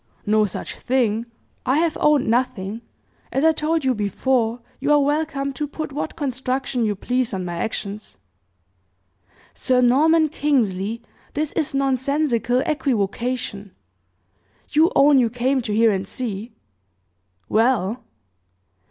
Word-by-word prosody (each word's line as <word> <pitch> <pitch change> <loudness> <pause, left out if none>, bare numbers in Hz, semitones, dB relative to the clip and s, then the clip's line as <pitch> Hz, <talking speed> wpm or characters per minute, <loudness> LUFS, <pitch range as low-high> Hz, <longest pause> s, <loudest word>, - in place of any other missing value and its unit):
"No 215 0 +3
such 195 - -6
thing. 235 -3 0 0.4
I 260 +3 +2
have 325 0 +1
owned 300 -3 +3
nothing. 230 -3 -1 0.5
As 270 - 0
I 320 - +6
told 315 -1 -1
you 260 - +3
before, 230 +2 0 0.2
you 285 +2 0
are 295 - +6
welcome 285 -1 0
to 295 +1 -3
put 310 +1 -5
what 295 +3 -4
construction 260 -3 -2
you 210 -1 0
please 250 +1 -1
on 185 -1 -3
my 175 -1 -4
actions." 205 +2 -5 1.4
"Sir 255 -1 +1
Norman 310 +6 +4
Kingsley, 230 -8 0 0.3
this 300 0 -1
is 300 -3 -2
nonsensical 265 -2 +1
equivocation! 235 -6 -2 0.9
You 315 +5 +4
own 280 -1 +6
you 240 -2 +3
came 255 +3 0
to 225 - -4
hear 225 +1 +4
and 190 -1 -2
see?" 225 -1 -5 0.9
"Well!" 225 0 +1
255 Hz, 125 wpm, -22 LUFS, 220-285 Hz, 1.4 s, I